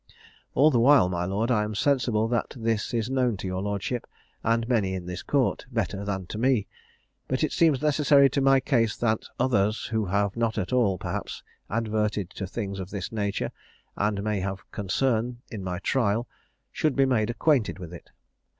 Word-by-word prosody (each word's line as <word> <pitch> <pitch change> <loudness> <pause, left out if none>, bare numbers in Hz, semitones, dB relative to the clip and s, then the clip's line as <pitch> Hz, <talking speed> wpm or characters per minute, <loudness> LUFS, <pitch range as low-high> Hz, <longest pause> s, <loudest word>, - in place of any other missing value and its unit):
"All 150 +4 +6
the 120 - +3
while, 130 -5 +6
my 90 -1 -1
lord, 105 +6 -1
I 110 -3 +3
am 105 0 -4
sensible 120 -4 +2 0.3
this 115 -3 -1
is 115 -2 -1
known 125 -4 +1
to 95 - -7
your 95 0 -2
lordship, 105 +4 -3 0.4
and 115 0 +1
many 105 -7 +1
in 90 -2 -5
this 90 0 -5
Court, 135 +1 0
better 100 -4 -2
than 95 -2 -3
to 105 - -6
me; 125 -4 +2 0.6
but 130 +3 -1
it 155 - +1
seems 155 -5 +3
necessary 145 -2 +5
to 140 - 0
my 135 0 +5
case 120 -5 +1
that 110 -2 0
others, 110 -4 +1
who 110 -2 0
have 100 +1 0
not 115 -1 0
at 105 +4 -2
all, 110 -7 +3
perhaps, - - -5 0.3
adverted 105 -3 -1
to 95 - -5
things 100 -1 -4
of 95 -1 -6
this 100 -3 -5
nature, 100 -3 -2 0.4
and 105 -1 0
may 105 -1 0
have 95 0 -4
concern 120 +4 -1
in 105 -5 -5
my 90 -1 -3
trial, 115 +2 0 0.4
should 155 -3 0
be 135 - +4
made 120 -5 +1
acquainted 125 -1 +1
with 90 -3 -9
it. 85 - -11
110 Hz, 185 wpm, -26 LUFS, 100-125 Hz, 0.6 s, All